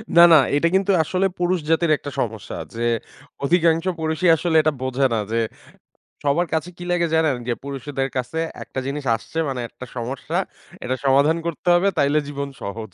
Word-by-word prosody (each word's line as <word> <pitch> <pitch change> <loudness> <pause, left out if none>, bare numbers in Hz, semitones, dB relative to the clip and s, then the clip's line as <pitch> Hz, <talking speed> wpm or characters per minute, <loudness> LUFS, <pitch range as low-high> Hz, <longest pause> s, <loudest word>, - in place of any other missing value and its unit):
না, 170 - +9
না 160 - +10 0.2
এটা 165 +3 +3
কিন্তু 195 +1 +3
আসলে 185 +4 0
পুরুষ 180 0 +1
জাতির 165 0 +3
একটা 145 - -7
সমস্যা 110 -3 -3 0.2
যে 115 - -3 0.6
অধিকাংশ 165 +2 +3
পুরুষই 160 +2 +1
আসলে 165 0 -1
এটা 155 0 +2
বোঝে 130 +1 0
না 110 - +1
যে 115 - +1 0.9
সবার 160 +5 +2
কাছে 160 +2 -1
কি 175 - -7
লাগে 175 -1 +2
জানেন 160 -4 +3
যে - - +2
পুরুষদের 135 0 -3
কাছে 130 +6 -2 0.2
একটা - - -8
জিনিস 140 +1 -4
আসছে 160 +8 -8
মানে 130 -2 -3
একটা 125 - -10
সমস্যা 125 +3 -4 0.5
এটা 130 +1 -1
সমাধান 140 +4 +4
করতে 170 +2 -3
হবে 185 +3 +3
তাইলে 145 +2 +3
জীবন 140 -1 -4
সহজ। 110 +1 -6
145 Hz, 175 wpm, -22 LUFS, 130-170 Hz, 0.9 s, না